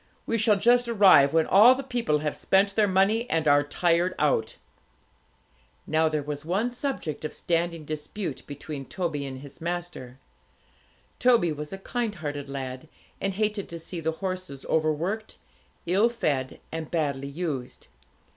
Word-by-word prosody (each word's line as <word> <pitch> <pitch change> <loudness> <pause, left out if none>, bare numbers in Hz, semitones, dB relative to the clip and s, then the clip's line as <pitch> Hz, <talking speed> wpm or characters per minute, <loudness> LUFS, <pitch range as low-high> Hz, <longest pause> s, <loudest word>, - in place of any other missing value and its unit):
We 230 - 0
shall 215 -1 +4
just 240 +4 +3
arrive 195 -11 +6
when 160 0 +3
all 225 +6 +7
the 270 - -5
people 235 - 0
have 150 - -1
spent 195 +1 +2
their 215 -2 +4
money, 200 +5 +2
and 160 -1 0
are 145 0 +6
tired 170 +4 +1
out.' - - +1 1.3
Now 160 0 +2
there 155 -2 -1
was 145 0 -5
one 195 +9 0
subject 240 - -4
of 155 - -4
standing 170 -2 -1
dispute 155 +1 -5
between 145 -1 -7
Toby 155 -6 -3
and 130 -1 -7
his 140 +1 -13
master. 170 -7 -5 1.0
Toby 235 -9 +4
was 150 0 -6
a 195 - -5
kind 225 +2 -3
hearted 145 -4 -5
lad, 135 +1 -6 0.3
and 195 -1 -1
hated 210 -1 -1
to 170 - -6
see 165 +2 -7
the 160 0 -1
horses 185 -6 -5
over 155 -1 +2
worked, 195 +9 -4 0.5
ill 195 +7 +3
fed, 145 - -2
and 160 -1 -5
badly 140 -5 -1
used. 140 -4 -5
165 Hz, 155 wpm, -26 LUFS, 145-200 Hz, 1.3 s, all